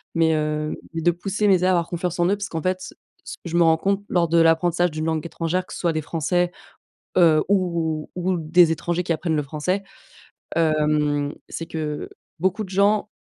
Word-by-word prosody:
mais 165 -1 +3
heu, 150 0 -1 0.2
mais 165 - -3
de 175 - +5
pousser 195 +4 -1
mes 195 -2 +6
erreurs 180 +1 +1
à 175 - +4
avoir 170 - -5
confiance 175 0 -3
en 175 - +3
eux 200 - +2
parce 205 0 -5
qu'en 160 -2 -4
fait, 185 0 0 0.4
ce - - -7
que - - -67
je 170 - -2
me 175 - +4
rends 160 -1 +4
compte 195 +4 0
lors 175 -1 +2
de 165 +1 +3
l'apprentissage 170 +2 +3
d'une 155 +1 -3
langue 160 -2 -1
étrangère 170 +2 -2
que - - -9
ce - - -6
soit 170 -2 +1
des 155 - -1
français, 175 +3 0 0.7
heu, 165 -4 +5
ou 170 -5 0
ou 180 0 0
des 165 +1 +4
étrangers 175 +2 -2
qui 170 - 0
apprennent 160 -1 -1
le 150 - +1
français, 170 +8 -2 0.7
hem, 150 -2 +1
c'est 165 - -6
que 155 -2 -4 0.3
beaucoup 190 +5 0
de - - -14
gens 205 +2 +2
170 Hz, 215 wpm, -23 LUFS, 155-180 Hz, 0.7 s, mes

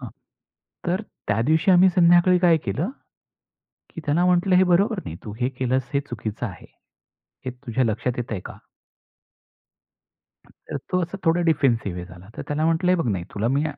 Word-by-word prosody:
हां. - - -7 0.8
तर 185 +4 0 0.3
त्या 105 +2 +1
दिवशी 160 +4 +3
आम्ही 185 +1 +6
संध्याकाळी 175 0 +5
काय 175 -2 +4
केलं, 145 - -1 1.0
की 165 - -9
त्याला 155 +5 +2
म्हटलं 180 +1 +3
"हे 185 - +6
बरोबर 200 +4 +2
नाही. 80 - -6
तू 105 - -7
हे 125 +1 +1
केलंस, 130 -1 -2
हे 140 - +3
चुकीचं 115 -1 -4
आहे. 95 -6 -9 0.8
हे 130 - -2
तुझ्या 125 0 -2
लक्षात 115 +2 -1
येतंय 115 -4 -3
का?" - - -9 1.9
तर - - -9
तो 185 - +1
असा 175 +3 -4
थोडा 165 +2 +3
डिफेन्सिव्ह 115 - +1
झाला. 90 +1 -14
तर - - -5
त्याला 150 +1 -1
म्हटलं 165 +2 +2
"हे - - +5
बघ 120 - 0 0.2
तुला 110 +3 0
मी 145 +2 +1
145 Hz, 165 wpm, -23 LUFS, 115-175 Hz, 1.9 s, आम्ही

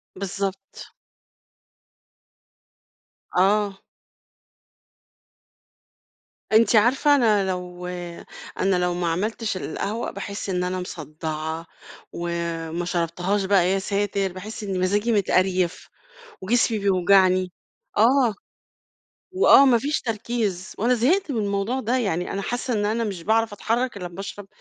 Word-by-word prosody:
بالضبط. 195 0 -5 2.4
آه. 200 +1 +2 2.7
أنتِ 225 +2 +5
عارفة 270 +7 +4
أنا 210 -7 +3
لو 180 -1 -5 0.7
أنا 190 0 +2
لو 180 0 +1
ما 175 0 -2
عملتش 210 +4 -2
القهوة 200 +6 -3
باحس 200 0 -6
إن 180 -1 0
أنا 185 +1 -2
مصدّعة، 160 -1 -5 0.5
وما 170 0 -3
شربتهاش 180 +3 -1
بقى 190 -2 +3
يا 195 - +1
ساتر 200 -1 -1
باحس 210 +4 -7
إني 195 -2 -3
مزاجي 205 +5 +1
متقريف، 185 -4 +1 0.5
وجسمي 225 +2 +1
بيوجعني 185 -1 +3 0.4
آه. 235 0 +4 1.0
وآه 370 -6 +7
ما 250 -3 +5
فيش 290 +6 -1
تركيز 215 -5 -3
وأنا 240 +4 +3
زهقت 305 - +2
من 240 - -1
الموضوع 205 +5 -1
ده، 250 +1 0
يعني 180 -6 -1
أنا 200 - -3
حاسّة 245 +3 -2
إن 205 -1 0
أنا 225 +2 0
مش 195 -6 -4
باعرف 225 +3 +1
أتحرّك 235 +3 -1
إلا 180 -3 -5
لمّا 175 +2 -8
أشرَب 200 0 -7
200 Hz, 115 wpm, -23 LUFS, 180-225 Hz, 2.7 s, وآه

